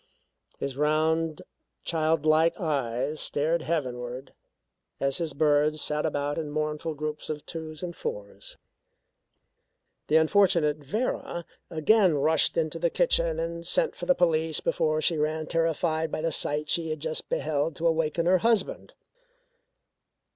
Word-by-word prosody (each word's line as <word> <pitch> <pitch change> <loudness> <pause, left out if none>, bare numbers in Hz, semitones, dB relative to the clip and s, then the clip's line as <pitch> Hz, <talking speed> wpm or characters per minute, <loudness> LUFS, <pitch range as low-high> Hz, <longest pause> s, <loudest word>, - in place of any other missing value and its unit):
His 135 -1 -4
round 155 +1 +1 0.4
child 160 -2 0
like 160 +3 +3
eyes 140 - -1
stared 160 +3 +1
heavenward 130 -5 -4 0.7
as 135 +2 0
his 165 -4 -2
birds 150 0 +2
sat 150 +1 0
about 145 0 -2
in 155 -2 -4
mournful 155 +1 -2
groups 150 0 -5
of 150 -1 -5
twos 160 -1 -7
and 175 -1 -5
fours. - - -7 1.5
The 155 - +2
unfortunate 160 -2 +4
Vera 170 - -3 0.2
again 175 +1 +3
rushed 155 +2 +3
into 165 0 -1
the 170 0 +2
kitchen 170 -2 +1
and 170 0 -4
sent 480 - +1
for - - -7
the 270 - +4
police 160 -2 +2
before 155 -1 0
she 160 0 +1
ran, 155 +1 -1
terrified 165 0 0
by - - -2
the 165 0 0
sight 150 0 -1
she 165 -1 0
had 155 -1 -3
just 160 +1 -3
beheld, 150 +1 -1
to 165 - -4
awaken 165 0 +1
her 185 +1 +4
husband. 225 -2 0
155 Hz, 140 wpm, -27 LUFS, 150-165 Hz, 1.5 s, unfortunate